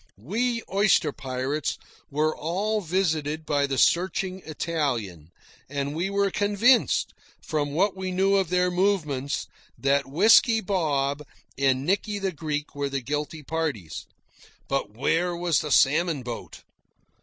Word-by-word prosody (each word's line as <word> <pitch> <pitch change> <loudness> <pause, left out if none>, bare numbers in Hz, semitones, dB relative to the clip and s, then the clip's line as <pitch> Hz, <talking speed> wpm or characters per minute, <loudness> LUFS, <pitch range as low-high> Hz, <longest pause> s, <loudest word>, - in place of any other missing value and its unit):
We 230 - -1
oyster 195 -6 +3
pirates 135 +3 -3 0.3
were 155 +2 0
all 200 +7 -1
visited 160 -4 -1
by 145 -2 +1
the 135 -1 -2
searching 185 +3 +1
Italian, 125 - -3 0.4
and 140 +1 -3
we 175 +4 -1
were 200 0 +1
convinced, 210 +6 +3 0.3
from 145 -2 -1
what 195 +6 +2
we 190 0 -4
knew 195 +2 +2
of 190 -4 +1
their 180 0 +2
movements, 165 -8 0 0.3
that 140 0 +1
Whisky 225 - +5
Bob 150 -8 0 0.3
and 135 0 +1
Nicky 205 +3 0
the 195 -1 -1
Greek 150 -2 -4
were 145 -1 -2
the 135 -1 -2
guilty 150 +4 -4
parties. 150 - -4 0.6
But 135 -6 -2
where 170 +6 +1
was 175 -2 +1
the 150 - -4
salmon 150 +2 +3
boat? 120 -1 -7
160 Hz, 130 wpm, -25 LUFS, 140-190 Hz, 0.6 s, Whisky